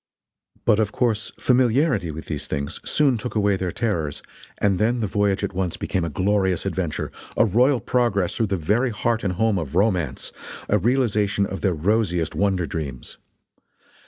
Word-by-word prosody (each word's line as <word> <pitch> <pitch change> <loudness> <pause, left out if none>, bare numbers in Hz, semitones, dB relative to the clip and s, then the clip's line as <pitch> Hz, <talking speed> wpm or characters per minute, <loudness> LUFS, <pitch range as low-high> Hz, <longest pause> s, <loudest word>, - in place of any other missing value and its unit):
But 110 -2 +4
of 105 -2 +1
course 115 -3 0
familiarity 125 - +2
with 80 +1 -7
these 75 -3 -4
things 70 -1 -4
soon 135 -6 +2
took 115 -1 -5
away 100 -2 +3
their 95 -2 -2
terrors, 85 -11 -2 0.3
and 100 -3 +1
then 120 +3 +2
the 110 - 0
voyage 100 -1 0
at - - -2
once 90 -2 -2
became 95 -3 -2
a 85 - -2
glorious 95 +2 +1
adventure, 95 -5 -2 0.3
a - - +5
royal 125 +6 +3
progress 105 -9 0
through 115 -2 +1
the 95 -1 -1
very 105 +11 +1
heart 115 +1 -1
and 95 -3 0
home 110 +1 +1
of 80 -2 -6
romance, 90 - 0 0.4
a 105 - +2
realization 105 -3 +1
of 95 0 -5
their 95 -4 +1
rosiest 90 -1 0
wonder 95 -3 +1
dreams. 70 -7 -6
100 Hz, 170 wpm, -23 LUFS, 90-115 Hz, 0.4 s, a